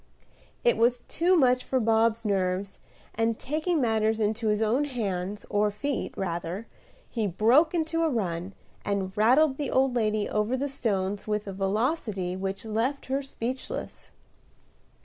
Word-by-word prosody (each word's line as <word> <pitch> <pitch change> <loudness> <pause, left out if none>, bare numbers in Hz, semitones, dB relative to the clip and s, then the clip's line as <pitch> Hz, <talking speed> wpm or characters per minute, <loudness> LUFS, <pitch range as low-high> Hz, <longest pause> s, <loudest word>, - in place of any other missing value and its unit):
It 485 - +4
was 240 +1 +2
too 355 +3 +2
much 255 -3 +4
for 260 - 0
Bob's 225 0 +2
nerves; 190 -1 -1 0.3
and, 225 0 0
taking 310 +4 -1
matters 220 -3 +1
into 220 +1 0
his 210 0 +2
own 230 +6 +2
hands, 205 -6 -3
or 210 +1 +2
feet, 250 +7 -3
rather, 175 +2 -3 0.4
he 225 -4 -1
broke 240 - +4
into 330 0 0
a 325 - +3
run, 185 - -2 0.3
and 195 -1 -2
rattled 265 +6 +4
the 290 -3 -2
old 260 -1 +2
lady 215 -2 +1
over 215 +4 0
the 280 +2 -1
stones 205 -7 -2
with 210 0 -1
a 195 - -5
velocity 195 - -1
which 195 +2 -4
left 230 +6 -1
her 275 - +1
speechless. 260 -1 -5
220 Hz, 150 wpm, -27 LUFS, 200-260 Hz, 0.4 s, It